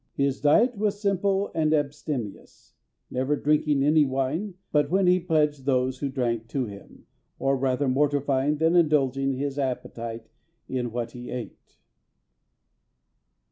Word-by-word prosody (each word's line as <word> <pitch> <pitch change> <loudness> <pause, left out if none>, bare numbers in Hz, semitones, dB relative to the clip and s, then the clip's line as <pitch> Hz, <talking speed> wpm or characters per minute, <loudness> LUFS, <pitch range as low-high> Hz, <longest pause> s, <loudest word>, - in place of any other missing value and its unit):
His 140 -1 0
diet 225 - +4
was 205 -1 0
simple 200 0 0
and 155 -1 +2
abstemious, 145 -6 -4 0.4
never 130 +3 0
drinking 150 -1 +2
any 150 +1 +5
wine 140 +9 -2 0.2
but 145 -1 +2
when 190 +3 +2
he 180 +1 +4
pledged 150 -5 0
those 130 -1 +1
who 140 - -2
drank 120 -4 -2
to 130 +1 -2
him, 100 -2 -12 0.3
and 135 -1 +1
rather 135 +1 +1
mortifying 140 +1 +1
than 160 +3 +2
indulging 135 -5 +2
his 140 +1 -3
appetite 115 -4 -4 0.4
in 125 -2 -2
what 120 0 -3
he 120 0 -9
ate. 125 -2 -8
140 Hz, 135 wpm, -26 LUFS, 130-155 Hz, 0.4 s, any